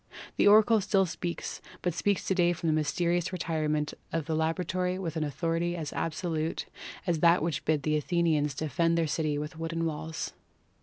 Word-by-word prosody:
The - - +4
oracle 215 +1 +6
still 195 0 +3
speaks, 175 0 -4 0.2
but 175 - +1
speaks 200 +4 0
to - - +1
day 175 -2 +3
from 170 - -7
the 160 - +3
mysterious 170 +3 0
retirement 155 -4 -1 0.2
of 165 -2 -1
the 160 - -2
laboratory 180 +3 0
with 170 -4 -4
an 160 - 0
authority 165 +4 -1
as 160 -4 -5
absolute 160 -1 -2 0.4
as 170 -4 +1
that 170 0 +5
which 165 -4 -2
bid 155 -3 +1
the 155 +1 +2
Athenians 150 -3 +1
defend 165 +3 +1
their 165 - +2
city 150 -1 -1
with 150 +2 -5
wooden 165 0 -2
walls. 160 0 -4
165 Hz, 175 wpm, -29 LUFS, 155-175 Hz, 0.4 s, oracle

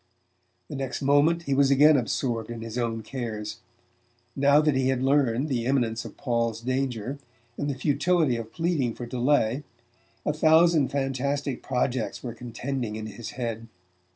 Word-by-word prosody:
The - - -7
next 135 0 -4
moment 145 +5 +3
he 140 - -1
was 135 0 +4
again 145 +3 +6
absorbed 120 -2 -1
in 115 -1 -6
his 115 0 -6
own 115 -2 -2
cares. 110 -5 -5 0.8
Now 140 +1 +5
that 150 -1 +3
he 130 0 +1
had 130 -1 0
learned 135 -1 +2
the 120 -4 -1
imminence 120 -4 0
of - - -10
Paul's 115 -3 -1
danger, 130 0 -2 0.4
and 145 - -2
the 140 - -3
futility 150 0 +2
of 115 -1 -6
pleading 165 -9 0
for 120 - -6
delay, 125 0 +1 0.6
a 150 - +1
thousand 160 -1 +4
fantastic 140 0 -2
projects 125 -2 -2
were 120 -2 -4
contending 120 -1 -4
in 110 0 -5
his 110 +1 -7
head. 115 -2 -4
130 Hz, 155 wpm, -26 LUFS, 115-140 Hz, 0.8 s, again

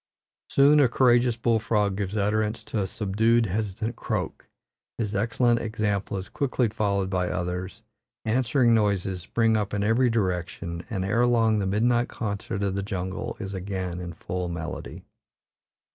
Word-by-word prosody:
Soon 145 +2 +5
a 135 -4 +5
courageous 120 -1 +3
bull 115 -1 +2
frog 105 -3 +1
gives 100 +1 -2
utterance 110 +2 0
to 110 - -2
a 95 - -1
subdued, 110 +4 +2
hesitative 105 +3 -2
croak; - - -4 0.5
his 105 -3 -2
excellent 115 +3 +2
example 105 -3 -2
is 95 0 -5
quickly 130 -4 0
followed 100 -3 0
by 90 -1 -1
others; 90 +4 -4 0.4
answering 120 +1 +3
noises 100 -4 +1
spring 115 +5 +1
up 105 -1 -1
in 100 - 0
every 115 +4 +3
direction, 90 -5 -2
and 95 -5 -2
ere 115 +5 +2
long 115 -3 +3
the 100 - -1
midnight 120 +4 +2
concert 100 -2 -3
of 100 -1 0
the 100 - -1
jungle 95 -2 -4
is 100 0 -5
again 95 -2 -4
in 85 -1 -6
full 90 +1 -4
melody. 85 -2 -6
105 Hz, 155 wpm, -26 LUFS, 95-115 Hz, 0.5 s, Soon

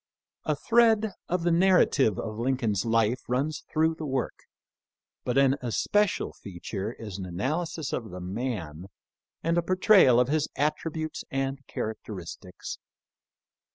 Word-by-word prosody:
A 155 - +1
thread 220 +5 +3 0.2
of 180 -1 0
the 175 - +2
narrative 165 - +4
of 110 -1 -4
Lincoln's 115 -5 0
life 115 +1 +2
runs 140 +5 -1
through 160 +1 +3
the 160 -1 -6
work, 130 -2 -3 0.8
but 125 - -1
an 135 0 +4
especial 190 - +1
feature 95 +3 -6
is 105 -5 -8
an 95 - -4
analysis 150 - -2
of 115 -3 -3
the 90 0 -7
man 90 - -4 0.6
and 165 +1 +2
a - - +2
portrayal 185 - +5
of 125 - +3
his 150 +1 +1
attributes 155 +2 -2
and 135 0 -2
characteristics. 105 -5 -6
135 Hz, 130 wpm, -27 LUFS, 110-160 Hz, 0.8 s, portrayal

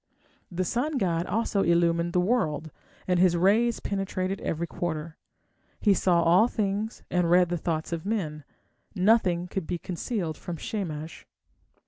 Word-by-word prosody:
The 180 +1 -1
sun 270 - -1
god 175 -6 0
also 215 -2 0
illumined 170 0 +2
the 180 - +3
world, 170 -7 0 0.4
and 180 -1 +2
his 180 -1 +4
rays 215 +6 +3
penetrated 195 -1 -2
every 165 +1 -2
quarter: 160 -1 -4 0.6
he 205 - +4
saw 175 -2 +2
all 180 +7 +5
things, 215 -1 -2
and 180 -1 +2
read 180 0 +5
the 175 - -1
thoughts 160 +1 -2
of 165 -1 -3
men; 165 -8 -3 0.5
nothing 185 -3 +3
could 180 -2 -4
be 175 - -2
concealed 175 - -4
from 175 -1 -6
Shamash. 160 -5 -5
180 Hz, 145 wpm, -27 LUFS, 170-200 Hz, 0.6 s, all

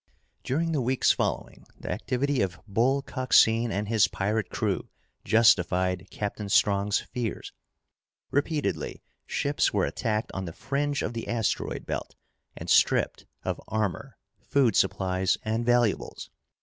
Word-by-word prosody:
During 165 +5 0
the 150 -4 0
weeks 130 +1 +3
following, - - -3
the - - -5
activity 135 +2 -1
of 90 -2 -2
Bull 125 +7 +2
Coxine 120 -3 +3
and 100 +1 -2
his 105 -4 +4
pirate 105 +3 -1
crew - - -2 0.3
justified 95 -4 +3
Captain 105 0 -4
Strong's 100 0 +3
fears. 120 -3 -5 0.8
Repeatedly, 145 +2 -1 0.2
ships 145 +1 +1
were - - +3
attacked 110 -1 -2
on 95 0 -4
the 85 - -6
fringe 140 - -1
of 115 - -3
the 115 - -5
asteroid 115 -2 -1
belt - - -4 0.4
and - - -7
stripped - - +3 0.2
of - - -3
armor, 110 -4 -2 0.3
food 130 -8 +2
supplies, 95 -1 +1
and 110 +2 -1
valuables. 120 -3 +1
110 Hz, 130 wpm, -27 LUFS, 100-130 Hz, 0.8 s, his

